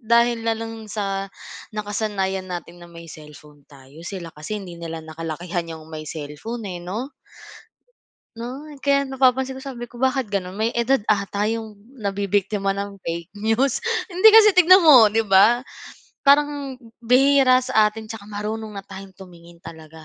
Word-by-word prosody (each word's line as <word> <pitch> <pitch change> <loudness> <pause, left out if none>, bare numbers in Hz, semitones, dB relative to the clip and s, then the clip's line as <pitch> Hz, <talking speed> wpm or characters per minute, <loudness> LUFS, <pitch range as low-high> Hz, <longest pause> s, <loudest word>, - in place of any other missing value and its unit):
dahil 235 0 +2
na 225 - +2
lang 225 -1 -7
sa, 195 -2 -3 0.5
nakasanayan 205 -3 -2
natin 175 -1 -7
na 175 - -12
may 170 0 -12
cellphone 150 -1 -14
tayo. 140 +2 -16
Sila 180 -4 -6
kasi 155 +8 -6
hindi 175 -2 -10
nila 165 -1 -6
nakalakihan 165 +1 -5
yung 160 0 -14
may 155 0 -7
cellphone, 160 +10 -7
eh, 180 -3 -5
'no? 215 +10 -5 1.3
'No? 250 +5 -7 0.2
Kaya 280 0 +2
napapansin 265 0 +1
ko - - -11
sabi 240 -3 -7
ko, 240 - -13
"Bakit 260 -3 0
gano'n? 185 -2 -3
May 220 +3 0
edad 235 0 +1
ata 205 0 0
yung 225 -2 -5 0.2
nabibiktima 200 -1 -1
ng 200 0 -5
fake 170 +3 -6
news." 225 +5 0 0.2
Hindi 375 +2 +5
kasi 425 -2 +7
tignan 365 +1 +8
mo, 245 -8 +8
'di 225 +1 0
ba? 200 +5 +5 0.6
Parang 285 -1 +2 0.2
bihira 255 +2 +4
sa 220 -5 +3
atin 220 +1 -9
tsaka 215 -2 -9
marunong 215 +1 -5
na 195 - -7
tayong 190 -1 -11
tumingin 175 -2 -14
talaga. 160 -1 -12
210 Hz, 155 wpm, -22 LUFS, 175-240 Hz, 1.3 s, tignan